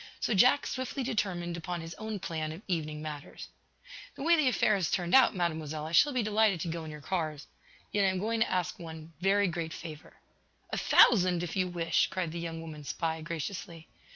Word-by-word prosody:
So - - 0
Jack 250 +8 +5
swiftly 260 +1 -3
determined 180 -8 -2
upon 175 +1 -4
his 165 0 -7
own 220 -1 -4
plan 160 -4 -3
of 165 +6 -9
evening 155 -4 -2
matters. 150 -2 -7 0.7
"The - - -6
way 335 +2 +5
the 305 -4 +2
affair 240 -3 +3
has 190 -5 +1
turned 175 -1 -1
out, 260 -5 +6
Mademoiselle, 155 -3 -2
I 160 - -6
shall 290 - +5
be 250 -4 0
delighted 215 -3 +2
to 170 - -2
go 165 0 -4
in 160 - -7
your 150 -1 -9
cars. 155 -3 -3 0.5
Yet 205 -1 +2
I - - +4
am 190 - -1
going 225 +4 -1
to 230 - +1
ask 180 -1 -1
one 160 -1 -9
every 200 +1 +4
great 165 -2 -3
favor." 155 -2 -9 0.6
"A - - -1
thousand, 180 -6 +5
if 175 - -4
you 185 -1 +1
wish!" 170 -2 +1
cried 180 -4 -3
the 170 - -5
young 165 -1 -5
woman 155 -2 -8
spy, 160 +2 -2
graciously. 170 +1 -6
175 Hz, 210 wpm, -30 LUFS, 160-205 Hz, 0.7 s, out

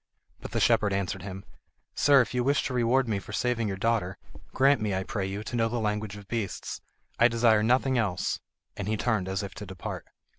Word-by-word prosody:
But - - -7
the - - 0
shepherd 100 -2 +3
answered 95 -1 -2
him: 95 -1 -7 0.5
"Sir, 140 -2 +5
if 125 - -3
you 125 -1 +1
wish 140 +3 +2
to 130 - -3
reward 125 +1 +2
me 105 -3 0
for 105 - -10
saving 120 -1 0
your 95 -1 -3
daughter, 100 -3 0 0.3
grant 135 -2 +4
me, 105 -3 0
I 95 - -1
pray 100 -1 -3
you, 100 +2 -4
to 115 - -5
know 115 -1 +2
the 120 - -2
language 105 -2 -2
of 100 -1 -12
beasts. 110 -5 -4 0.4
I 120 - +7
desire 115 -2 +4
nothing 125 +3 +3
else"; 100 -6 -1 0.4
and 100 -1 -4
he 110 0 0
turned 110 -5 0
as 95 +1 -2
if 100 - -6
to 105 - -8
depart. 95 -1 -6
110 Hz, 220 wpm, -28 LUFS, 100-120 Hz, 0.5 s, I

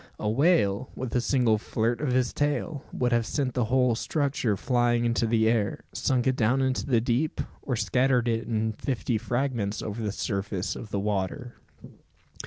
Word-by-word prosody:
A 105 - -3
whale, 130 - +2
with 130 -2 -5
a 125 - +3
single 120 -4 +2
flirt 115 +2 -1
of 145 -4 0
his 125 -1 +1
tail, 145 0 -1
would 125 -1 0
have 120 -1 +3
sent 130 +1 -2
the 125 -3 +1
whole 125 +1 +3
structure 130 -4 0
flying 120 +1 +1
into 115 0 +1
the 110 -1 +2
air, 110 -3 0
sunk 125 -2 0
it 130 -1 +2
down 125 +2 +2
into 130 +1 0
the 120 -4 +3
deep, 125 +6 0 0.2
or 130 - -2
scattered 125 +4 +2
it 115 0 -1
in 110 -1 0
fifty 120 -1 -2
fragments 120 -3 -1
over 110 +2 -4
the 105 -2 -1
surface 100 -2 -3
of 110 - -8
the 100 - -2
water. 105 +4 -2
120 Hz, 180 wpm, -27 LUFS, 110-130 Hz, 0.2 s, a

